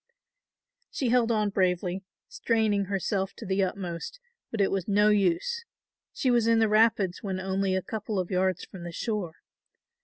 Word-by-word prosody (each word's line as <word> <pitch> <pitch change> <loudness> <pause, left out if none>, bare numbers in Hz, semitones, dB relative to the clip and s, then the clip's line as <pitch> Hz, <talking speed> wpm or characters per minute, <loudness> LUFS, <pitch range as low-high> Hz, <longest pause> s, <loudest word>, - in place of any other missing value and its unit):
She 260 - -1
held 240 -1 +3
on 210 -2 +1
bravely, 185 0 0 0.2
straining 220 - +1
herself 195 0 -2
to 225 - -9
the 190 0 0
utmost, 185 - -4 0.3
but 225 - -5
it 195 - +3
was 195 -3 -1
no 210 +1 +4
use; 205 - +1 0.5
she 255 - 0
was 235 -2 +3
in 230 0 +4
the 225 -1 +4
rapids 215 -4 +3
when 190 -3 -3
only 190 0 0
a 190 - -1
couple 215 0 -4
of 185 0 -2
yards 185 -1 0
from 190 - -11
the 175 - -6
shore. 190 -3 -3
200 Hz, 165 wpm, -27 LUFS, 185-220 Hz, 0.5 s, no